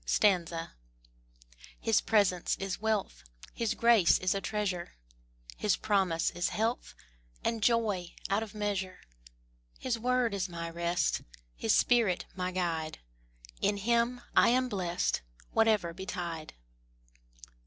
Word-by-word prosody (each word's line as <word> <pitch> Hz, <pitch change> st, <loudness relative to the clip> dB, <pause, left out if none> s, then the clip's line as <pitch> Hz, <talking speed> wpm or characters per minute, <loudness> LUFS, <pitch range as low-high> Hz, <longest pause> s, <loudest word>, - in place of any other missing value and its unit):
His 225 Hz, -, +2 dB
presence 200 Hz, -5 st, +2 dB
is 195 Hz, 0 st, -4 dB
wealth, 210 Hz, -, -1 dB, 0.3 s
His 225 Hz, -1 st, -1 dB
grace 230 Hz, -7 st, +5 dB
is 185 Hz, -, +1 dB
a 195 Hz, -, -2 dB
treasure, 195 Hz, -5 st, -2 dB, 0.6 s
His 210 Hz, -, +1 dB
promise 190 Hz, -6 st, +1 dB
is 175 Hz, +1 st, -1 dB
health 225 Hz, +3 st, -2 dB, 0.5 s
And 230 Hz, -1 st, -1 dB
joy 210 Hz, -6 st, +1 dB
out 200 Hz, +2 st, +1 dB
of 220 Hz, -1 st, -7 dB
measure. 195 Hz, -3 st, -2 dB, 0.8 s
His 240 Hz, -3 st, -2 dB
word 250 Hz, -1 st, +1 dB
is 190 Hz, -1 st, -2 dB
my 170 Hz, -1 st, -5 dB
rest, 170 Hz, +1 st, 0 dB, 0.3 s
His -, -, +2 dB
spirit 230 Hz, -7 st, +3 dB
my 180 Hz, -1 st, -2 dB
guide: 165 Hz, -4 st, -2 dB, 0.6 s
In 205 Hz, -, +2 dB
Him 235 Hz, +4 st, +1 dB
I -, -, +6 dB
am 255 Hz, +1 st, +2 dB
blest 180 Hz, -5 st, -1 dB, 0.3 s
Whatever 215 Hz, -7 st, +2 dB
betide. 175 Hz, -3 st, -5 dB
200 Hz, 115 wpm, -31 LUFS, 175-225 Hz, 0.8 s, I